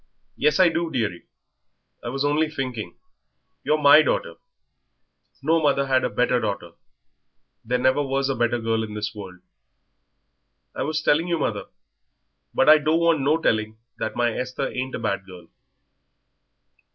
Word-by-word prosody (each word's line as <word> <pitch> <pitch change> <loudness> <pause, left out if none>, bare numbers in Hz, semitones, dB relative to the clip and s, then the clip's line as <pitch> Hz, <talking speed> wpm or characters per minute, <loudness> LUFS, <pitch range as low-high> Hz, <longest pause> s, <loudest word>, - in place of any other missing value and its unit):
"Yes, 150 +2 +1
I 185 -2 +6
do, 165 0 -2
dearie. 110 - -3 0.8
I 120 - -4
was 135 +3 -2
only 150 +2 +1
thinking. 125 - -5 0.7
You're 155 - +2
my 150 +1 +7
daughter; 85 - -2 1.1
no 160 +3 +2
mother 140 -2 +2
had 130 -1 +1
a - - 0
better 125 +3 +1
daughter. 100 -6 -4 0.9
There 125 +2 0
never 130 +3 +2
was 135 -1 -1
a 135 - 0
better 120 0 +1
girl 115 -1 -1
in 105 -1 -7
this 105 0 -4
world." 95 -4 -10 1.3
"I - - -5
was 155 +2 -2
telling 160 +4 +2
you, 170 -1 0
mother - - -2 0.5
" - - -52
"But - - +3
I 155 0 +8
don't 155 +2 +1
want 170 -3 +2
no 145 +4 +2
telling 110 -8 -1 0.2
that 110 - -3
my 120 -1 +1
Esther 130 +2 -3
ain't 130 +1 -4
a - - -3
bad 100 -1 -3
girl." 90 -3 -13
130 Hz, 160 wpm, -23 LUFS, 110-150 Hz, 1.3 s, I